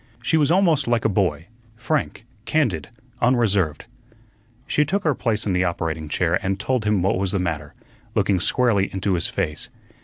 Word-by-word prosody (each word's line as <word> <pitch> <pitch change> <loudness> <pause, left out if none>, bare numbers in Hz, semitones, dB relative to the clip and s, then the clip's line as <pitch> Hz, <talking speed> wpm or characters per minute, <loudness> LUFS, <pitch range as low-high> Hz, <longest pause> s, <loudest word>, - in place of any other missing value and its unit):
She - - +1
was 150 -3 +3
almost 165 -6 +3
like 120 -1 +1
a - - +4
boy, 90 -6 0 0.3
frank, 120 0 -2 0.2
candid, 115 - 0 0.3
unreserved. 105 - +2 0.8
She 150 - +2
took 190 +7 -1
her 155 - +2
place 115 -4 -1
in 100 - 0
the 90 0 +2
operating 80 -3 -2
chair 85 +3 +1
and 95 0 -1
told 115 +1 -1
him 105 -4 +2
what 95 -1 +1
was 95 0 0
the - - +2
matter, 80 -5 -3 0.4
looking 95 -3 +2
squarely 100 0 +2
into 95 0 -1
his 85 - 0
face. 75 - -3
100 Hz, 175 wpm, -22 LUFS, 90-125 Hz, 0.8 s, a